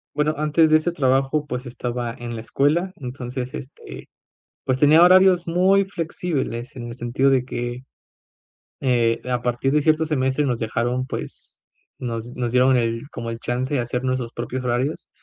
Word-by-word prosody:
Bueno, 150 +1 +1
antes 155 +1 +3
de 155 - +8
ese 155 +3 -1
trabajo, 135 -1 +1
pues 125 -2 -5
estaba 120 -1 -4
en 120 -1 -6
la 110 - -5
escuela. 150 +10 +1
Entonces 125 -3 -6
este, 140 -1 -9 0.6
pues 130 0 0
tenía 150 +4 +6
horarios 185 0 +6
muy 185 +4 +3
flexibles 160 -10 -3
en 120 -2 -6
el 120 - -8
sentido 125 +3 +1
de 130 -2 +2
que, 120 0 -5 1.0
eh, 120 -3 +1
a 125 -1 0
partir 125 +2 0
de 150 +1 +3
cierto 155 +1 +2
semestre 140 -1 0
nos 125 -4 -1
dejaron 120 +3 -1
pues - - -7 0.4
nos 120 -1 -5
nos 120 -2 -2
dieron 130 +1 +4
el 115 +2 -1
como 115 -2 -5
el 115 0 -5
chance 125 +3 -2
de 140 - +2
hacer 125 +1 -2
nuestros 130 -2 -2
propios 125 +2 -4
horarios. 125 +5 -2
130 Hz, 170 wpm, -22 LUFS, 120-150 Hz, 1.0 s, de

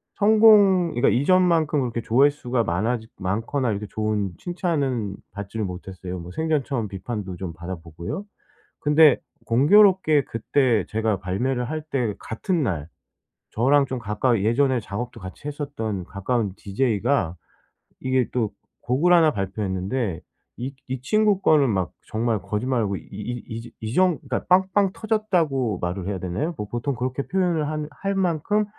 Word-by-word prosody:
성공 205 -5 +5
그러니까 120 +3 +3
이전만큼 165 +1 +3
그렇게 120 -3 -2
조회수가 125 0 +2
많아지 110 +5 -1
많거나 115 +7 -1
이렇게 105 0 -2
좋은 105 -2 -1
칭찬은 140 - -1 0.2
받지를 100 +2 -5
못했어요. 90 0 -6
뭐 85 +1 -9
생전 155 - 0
처음 120 -5 -2
비판도 95 -1 -5
좀 90 -2 -5
받아보고요. 85 - -6 0.5
근데 150 -1 +6
공교롭게 155 - +4
그때 115 -3 +1
제가 110 -1 0
발매를 120 +7 -1
할 155 0 -3
때 125 -8 0
같은 165 - -2
날 85 - -2 0.6
저랑 140 +5 +3
좀 130 -1 -4
가까이 105 0 0
예전에 130 +3 +2
작업도 115 +3 -6
같이 95 +10 -9
했었던 140 -10 -4
가까운 100 +2 -2
디제이가 105 -2 0 0.7
이게 130 -2 +1
또 115 -4 0 0.3
곡을 145 +9 +2
1 165 -3 +6
발표했는데 95 - -2 0.4
이 130 +3 -5
이 130 -1 -4
친구 210 +6 +2
거는 145 -4 +4
막 95 -6 -1 0.3
정말 115 -3 +1
거짓말 105 +7 -1
안 - - +1
하고 100 -1 -1
이 - - -9 0.4
이 115 -1 -6
지 120 - -12
이 110 0 -3
정 180 -4 +3
그러니까 130 -2 -3
빵빵 190 +1 +3
터졌다고 165 - 0
말을 90 +1 -3
해야 100 -2 -2
되나요? 95 - -3
뭐 105 - -4
보통 120 +4 -2
그렇게 130 +3 -3
표현을 175 -5 +1
한 150 -1 -3
할 195 0 -1
만큼 190 +3 +1
125 Hz, 320 characters per minute, -24 LUFS, 100-155 Hz, 0.7 s, 근데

